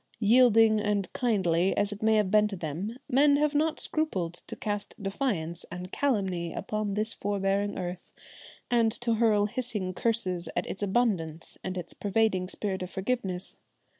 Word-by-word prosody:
Yielding 225 -1 +5
and 205 -3 -1
kindly 190 -7 +1
as 205 0 +1
it 205 - -7
may 220 0 +4
have 210 -3 +2
been 210 0 +5
to 205 - -5
them, 175 - -4
men 285 +3 +5
have 300 +1 +2
not 310 +2 +1
scrupled 190 - -1
to - - -6
cast 205 -1 -4
defiance 195 - -2
and 180 +1 -7
calumny 190 -11 0
upon 210 0 -3
this 215 +2 +1
forbearing 200 0 -1
earth 180 -1 -5 0.6
and 230 -2 +4
to 235 +1 -1
hurl 215 -2 +3
hissing 210 -5 -3
curses 185 -5 0
at - - 0
its 195 - -6
abundance 190 -7 -1
and 185 0 -4
its 180 - -6
pervading 200 -3 +1
spirit 190 0 -3
of 180 - -4
forgiveness. 190 -3 -3
205 Hz, 160 wpm, -28 LUFS, 185-225 Hz, 0.6 s, Yielding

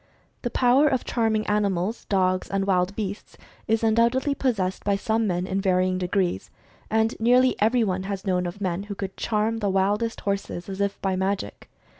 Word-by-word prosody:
The 240 - -2
power 255 +4 +4
of 260 -4 0
charming 220 -2 0
animals, 205 0 -1
dogs 185 -2 +1
and 195 0 0
wild 185 0 +1
beasts 205 -2 -5 0.3
is 225 +1 +1
undoubtedly 235 +5 +2
possessed 200 -10 -1
by 200 -1 +1
some 220 +2 0
men, 180 -1 -1
in 190 +1 -1
vary 185 -1 +2
ing 185 0 -1
degrees. 180 - -1 0.4
And 220 +1 +2
nearly 250 +3 +4
everyone 215 -4 +2
has 195 -1 -4
known 180 -2 0
of 175 +3 -7
men 185 -2 -2
who 200 - -4
could 190 -1 -5
"charm" 220 +1 0
the 205 -2 0
wildest 205 +4 0
horses, 200 -3 -3
as 195 +1 -4
if 200 0 -1
by 190 -1 +1
magic. 190 +1 -3
200 Hz, 180 wpm, -25 LUFS, 190-225 Hz, 0.4 s, power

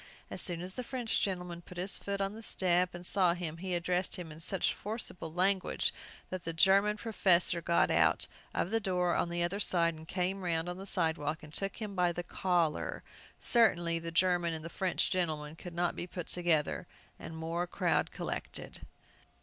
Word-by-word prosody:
As - - 0
soon 170 -2 0
as 185 +1 -6
the 250 - -4
French 245 -2 -1
gentleman 180 -3 -2
put 180 +1 -12
his 185 +2 -1
foot 200 0 -3
on 195 +1 -1
the 220 - -9
step 180 -4 +2
and 175 +1 -7
saw 180 -2 +3
him, 165 -3 -4
he 185 +1 -2
addressed 180 +1 +1
him 175 -4 -6
in 155 - -9
such 185 +3 +1
forcible 205 -6 -5
language 185 +3 +1 0.4
that 185 -1 -4
the 165 - -3
German 200 +5 +4
professor 185 -6 +3
got 170 +1 +3
out - - +3 0.3
of 180 - -1
the 225 - +2
door 180 -4 +1
the 170 0 -1
other 185 +4 -1
side, 170 -4 +3
and 160 0 -11
came 185 +3 -1
round 165 -2 0
on 180 +1 -4
the 195 - -7
sidewalk, 160 -4 0
and 150 0 -11
took 195 +3 -2
him 215 -3 -5
by 180 -2 +2
the 175 +1 -4
collar. 175 -3 0 0.4
Certainly 175 -8 +3
the 165 0 -5
German 175 -1 +2
and 160 +1 -6
French 190 -2 +1
gentlemen 155 -4 -1
could 175 0 -9
not 175 0 +1
be 175 - -4
put 175 -1 -5
together, 170 -4 +1 0.3
and 160 - -8
more 165 +2 -2
crowd - - +1
collected! - - -5
175 Hz, 190 wpm, -32 LUFS, 170-190 Hz, 0.4 s, German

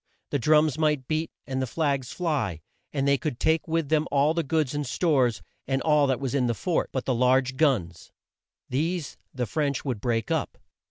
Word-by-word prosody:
The 145 - +1
drums 150 +2 +3
might 150 -4 +1
beat 160 +1 -1 0.2
and 130 -1 -2
the 130 - -1
flags 140 -3 -1
fly, 145 - -1 0.3
and 140 -1 -1
they 140 -1 +3
could 150 -6 -3
take 160 +1 +1
with 165 -3 -1
them 155 0 +2
all 145 +2 +3
the 170 - 0
goods 155 -2 0
and 145 0 -1
stores, 130 -4 +1 0.2
and 135 0 +1
all 150 -2 +4
that 130 -2 0
was 135 -3 -3
in 130 -3 +2
the 120 - 0
fort 175 - -1
but 130 - -3
the 130 - +1
large 130 +2 +2
guns. 115 - 0 0.6
These 160 +4 -2 0.2
the 125 -2 -2
French 140 +4 -1
would 125 -7 -2
break 115 -2 -1
up. - - -1
140 Hz, 200 wpm, -26 LUFS, 125-155 Hz, 0.6 s, all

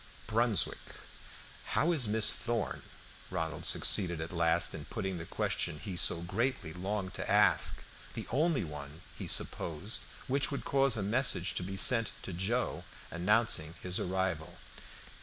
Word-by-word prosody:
"Brunswick. 115 -1 +1 1.0
How 170 - +3
is 140 -9 +3
Miss 105 0 +4
Thorn?" 120 -3 -3 0.5
Ronald 80 -1 -4
succeeded 85 -5 +4
at 80 +1 -5
last 85 -2 +2
in - - -7
putting 95 -2 -4
the 80 - -8
question 75 - -1
he 90 +6 -6
so 85 -1 +3
greatly 100 -2 -2
longed 95 +1 -4
to - - -3
ask - - +3 0.3
the - - -5
only 150 0 +1
one, 75 0 -9
he - - -6
supposed, 85 +7 0 0.2
which 135 +1 +1
would 140 - -5
cause 135 -3 +3
a 105 - -1
message 110 -4 +1
to - - -1
be 95 +2 -5
sent 115 +3 +4
to 95 - -6
Joe 105 +8 -1 0.3
announcing 90 -3 +1
his 90 0 0
arrival. 90 -3 -2
95 Hz, 145 wpm, -32 LUFS, 85-115 Hz, 1.0 s, Miss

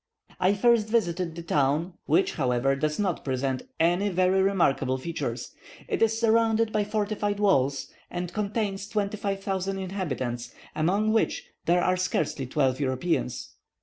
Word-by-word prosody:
I 190 +2 +3
first 230 +1 +3
visited 180 -7 0
the 170 - -6
town, 150 +3 +1
which, 380 +1 +3
however, 130 -1 +1
does 150 +2 -1
not 195 -5 -1
present 130 -1 -1 0.2
any 175 +5 +3
very 185 +1 +3
remarkable 140 -9 +2
features. 165 +5 -4 0.3
It - - -2
is 225 0 +3
surrounded 225 -1 +3
by 210 -1 +1
fortified 205 -1 -1
works, 140 -9 +2 0.2
and 175 0 -4
contains 200 -1 -2
25,000 195 -2 -2
inhabitants, 130 -11 -4 0.2
among 200 +7 +2
which 225 - +1 0.2
there 175 +1 +4
are 185 0 +2
scarcely 150 -7 -1
twelve 130 -1 +1
Europeans. 130 -1 -1
185 Hz, 135 wpm, -27 LUFS, 140-205 Hz, 0.3 s, there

